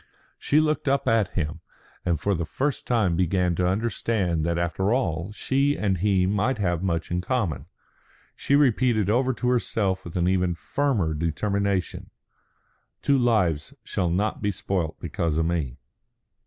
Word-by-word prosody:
She 150 - +3
looked 155 -1 0
up 140 0 +1
at 110 -4 +2
him, 75 -4 -2 0.4
and 85 -4 0
for 100 +5 0
the 85 -2 -1
first 135 - -2
time 110 -8 +2
began 90 0 +1
to 90 +2 0
understand 95 -4 0
that 85 0 0
after 85 +4 0
all 90 -7 -1
she 140 +6 +1
and 95 -4 0
he 95 -1 +2
might 105 +7 +1
have 85 -5 0
much 85 -4 -2
in 90 0 0
common. 100 - -2 0.7
She 140 - +1
repeated 120 -7 +3
over 130 +3 +2
to 125 - -2
herself 100 -6 0
with 85 +1 -6
an 90 0 +2
even 90 -2 +1
firmer 100 - 0
determination, 95 +5 -1 0.9
"Two 140 -1 +3
lives 100 -11 +1
shall 90 - -1
not 100 +5 -1
be 105 -1 +1
spoilt 95 -5 -3
because 85 -1 -2
of 80 - +2
me." 80 -7 -2
95 Hz, 155 wpm, -25 LUFS, 85-115 Hz, 0.9 s, She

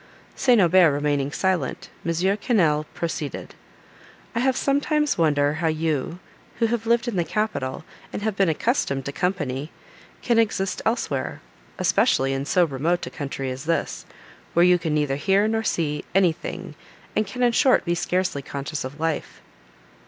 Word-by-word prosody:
St. 250 -4 +4
Aubert 180 -3 +6
remaining 145 -1 0
silent, 185 -5 -1
M. 170 - -1
Quesnel 175 -3 +1
proceeded: 160 -3 -4 0.8
"I 230 - -1
have 260 +1 +2
sometimes 295 +2 +1
wondered 150 -2 +2
how 165 0 0
you, 160 0 -1 0.4
who 230 - +2
have 225 0 -1
lived 235 +1 +2
in 230 -5 -2
the 175 - +2
capital, 165 -9 -2 0.3
and 205 - -5
have 220 -2 -1
been 195 -3 +3
accustomed 150 - 0
to 140 - -3
company, 145 -5 -2 0.5
can 235 -2 +3
exist 195 -4 0
elsewhere;—especially 220 - 0
in 135 +1 -2
so 175 +3 +3
remote 160 +4 -1
a - - -7
country 135 -2 -4
as 130 +3 -7
this, 165 +1 -2 0.5
where 170 +1 +6
you 180 0 +5
can 160 -3 -1
neither 145 -2 0
hear 195 +7 +2
nor 225 0 0
see 150 -7 -1
anything, 175 -4 0 0.4
and 215 - +1
can 250 +5 -3
in 240 - +4
short 255 -1 +3
be 170 - +1
scarcely 175 -3 -1
conscious 140 +3 -5
of 135 +4 -7
life." 160 -1 -2
170 Hz, 155 wpm, -24 LUFS, 145-215 Hz, 0.8 s, Aubert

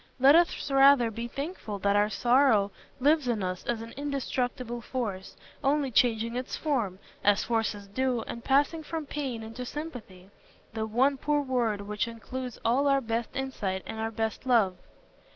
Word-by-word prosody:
Let 270 +2 +7
us 335 -4 +2
rather 270 -3 +6
be 235 +2 -5
thankful 275 - -5
that 200 +1 +1
our 205 +1 +3
sorrow 240 -2 +3 0.3
lives 295 +1 +3
in 225 -5 0
us 185 0 -3
as 230 -2 -1
an 230 - -9
indestructible 255 -4 -3
force, 215 -7 -4 0.3
only 280 -1 +1
changing 230 -1 +2
its 250 +1 -3
form, 240 - -1 0.3
as 205 0 +4
forces 225 -3 -1
do, 250 +4 -1
and 235 +1 -7
passing 290 +4 +2
from 315 0 -5
pain 270 -6 -4
into 225 +3 -7
sympathy—the 220 - -8
one 260 +6 +2
poor 295 +2 +1
word 240 -6 0
which 210 +2 -2
includes 245 +2 -6
all 260 +5 +3
our 275 -1 +4
best 230 -2 -3
insight 205 -8 -3
and 220 - -6
our 220 0 -1
best 225 +2 -3
love. 220 -7 +4
240 Hz, 160 wpm, -28 LUFS, 220-275 Hz, 0.3 s, Let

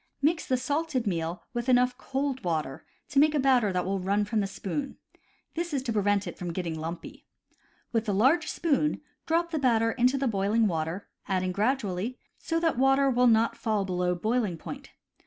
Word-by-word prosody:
Mix 315 +3 +1
the 255 - +2
salted 285 0 -1
meal 170 -3 -2
with 240 +1 -2
enough 250 0 +4
cold 270 0 -3
water 155 -6 -2 0.3
to 275 - +2
make 305 +1 +4
a - - +2
batter 255 -6 +3
that 180 -1 -1
will 195 +1 -1
run 200 +3 +1
from 220 +1 -1
the 200 - 0
spoon; 235 +8 -4 0.6
this 340 -2 -3
is 265 - -1
to 235 -4 -2
prevent 205 -1 +1
it - - -7
from 175 -2 -3
getting 170 -1 -3
lumpy. 160 +2 -7 0.6
With 225 -2 0
a - - +3
large 270 - +3
spoon 300 -2 0 0.3
drop 335 +1 +1
the 315 - -1
batter 230 -4 +3
into 255 +3 +2
the 270 0 0
boiling 215 +1 +2
water, 165 +1 -2 0.2
adding 185 -1 0
gradually, 210 +1 -1 0.2
so 330 0 -1
that 325 -7 +1
water 270 +1 +4
will 250 0 +4
not 225 0 +3
fall 215 -4 -1
below 180 -1 0
boiling 215 -1 0
point. - - -8
230 Hz, 190 wpm, -28 LUFS, 190-270 Hz, 0.6 s, enough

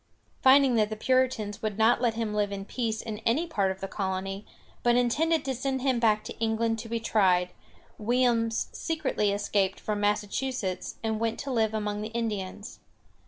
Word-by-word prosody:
] - - -38
Finding 265 0 +6
that 210 -1 +3
the 215 - -3
Puritans 235 -3 0
would 215 -2 -2
not 225 +2 +4
let 235 -3 +1
him 225 -2 -2
live 205 -1 0
in 195 -1 -5
peace 225 -1 -2
in 215 -2 -5
any 240 +9 +1
part 200 - 0
of 190 0 -5
the 195 - -3
colony, 195 0 -3 0.3
but 240 0 +3
intended 300 +7 +2
to 265 - -1
send 265 +1 -2
him 260 -3 +2
back 215 -2 +3
to - - -7
England 225 0 0
to 225 - -7
be 230 0 -1
tried, 185 -5 +2 0.5
Williams 230 0 +1
secretly 310 - -1
escaped 200 -1 0
from 210 -1 -2
Massachusetts, 205 0 -1
and 220 -1 -1
went 230 0 -1
to 275 - -5
live 220 -3 +1
among 210 -1 -2
the 215 - -3
Indians. 210 -3 -4
220 Hz, 185 wpm, -28 LUFS, 205-245 Hz, 0.5 s, Finding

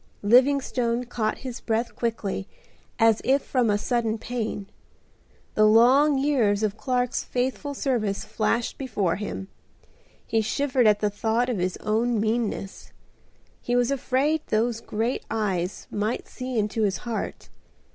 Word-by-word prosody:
Livingstone 250 0 +3
caught 230 -3 -2
his 250 -2 -5
breath 230 +1 -1
quickly 215 -4 -2 0.5
as 225 -2 +4
if 275 +1 +2
from 250 -4 +1
a 205 - +3
sudden 230 0 0
pain. 225 -3 -4 0.9
The 215 0 +5
long 260 +7 +5
years 240 -8 +2
of 210 -1 0
Clark's 250 +1 -1
faithful 260 +3 -2
service 225 -8 -1
flashed 230 +1 -1
before 210 -10 -1
him. 200 -2 -5 0.8
He 225 - +1
shivered 255 +1 +1
at 210 -1 +4
the 210 -1 +1
thought 225 +4 0
of 230 -6 -1
his 180 0 -1
own 225 +2 0
meanness. 220 -2 -2 0.7
He 245 - -1
was 245 +1 +2
afraid 275 +3 +1
those 230 +1 0
great 230 +4 -2
eyes 195 -5 -2
might 210 +3 -2
see 255 -1 -5
into 215 +1 0
his 195 -4 +1
heart. 230 -2 -4
230 Hz, 135 wpm, -25 LUFS, 215-250 Hz, 0.9 s, The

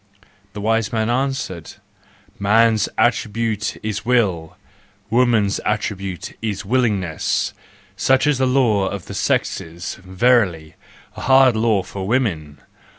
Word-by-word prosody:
" 100 -1 -35
The 105 - -6
wise 115 0 0
man 110 0 0
answered: 125 - -3 0.3
" - - -31
Man's 115 -1 +4
attribute 110 -1 0
is 105 -2 -3
will, 100 -10 0 0.5
woman's 115 -4 +2
attribute 100 -3 -3
is 100 -3 -3
willingness,— 100 -8 0 0.4
such 130 +6 +2
is 145 -3 +2
the 130 - +2
law 115 -7 +2
of 100 -2 -5
the - - -8
sexes, 85 +3 -2
verily! 95 -5 +1 0.4
a - - -8
hard 130 -2 +5
law 110 -3 +1
for 95 0 -6
woman! 95 - -1
105 Hz, 125 wpm, -20 LUFS, 95-120 Hz, 0.5 s, hard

